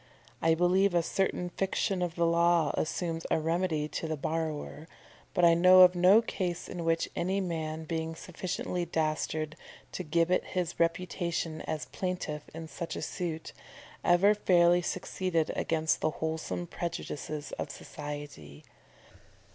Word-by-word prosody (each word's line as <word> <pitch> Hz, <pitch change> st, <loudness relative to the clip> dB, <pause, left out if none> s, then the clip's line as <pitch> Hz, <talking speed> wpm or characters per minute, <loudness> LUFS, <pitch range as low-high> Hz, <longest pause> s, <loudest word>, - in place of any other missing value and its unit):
I 165 Hz, 0 st, +4 dB
believe 180 Hz, +2 st, +3 dB
a 170 Hz, -, +3 dB
certain 180 Hz, 0 st, -1 dB
fiction 195 Hz, 0 st, -1 dB
of 175 Hz, -2 st, -2 dB
the 170 Hz, -, +2 dB
law 170 Hz, 0 st, +3 dB
assumes 165 Hz, 0 st, -2 dB
a -, -, +2 dB
remedy 165 Hz, -1 st, 0 dB
to 165 Hz, -, -4 dB
the 155 Hz, -1 st, -2 dB
borrower; 155 Hz, 0 st, -3 dB, 0.5 s
but 180 Hz, -2 st, +5 dB
I 170 Hz, -, +7 dB
know 185 Hz, +2 st, +7 dB
of 180 Hz, 0 st, +8 dB
no 185 Hz, +5 st, +6 dB
case 180 Hz, -5 st, -3 dB
in 175 Hz, -2 st, -5 dB
which 165 Hz, 0 st, +1 dB
any 190 Hz, +3 st, 0 dB
man, 160 Hz, -3 st, -3 dB
being 160 Hz, 0 st, -3 dB
sufficiently 180 Hz, +1 st, -3 dB
dastard 155 Hz, -1 st, -1 dB, 0.4 s
to 185 Hz, -, -4 dB
gibbet 170 Hz, +3 st, +2 dB
his 180 Hz, -3 st, -3 dB
reputation 170 Hz, -1 st, -1 dB
as 155 Hz, -1 st, -3 dB
plaintiff 180 Hz, -5 st, -3 dB
in 165 Hz, 0 st, -7 dB
such 165 Hz, +1 st, -5 dB
a -, -, -4 dB
suit, 165 Hz, -3 st, -4 dB, 0.5 s
ever 185 Hz, +4 st, +5 dB
fairly 175 Hz, -3 st, +4 dB
succeeded 180 Hz, -2 st, -1 dB
against 160 Hz, -1 st, 0 dB
the 155 Hz, -, +2 dB
wholesome 160 Hz, +2 st, -3 dB
prejudices 160 Hz, -3 st, -5 dB
of -, -, -3 dB
society. 145 Hz, -, -8 dB
170 Hz, 140 wpm, -30 LUFS, 160-180 Hz, 0.5 s, of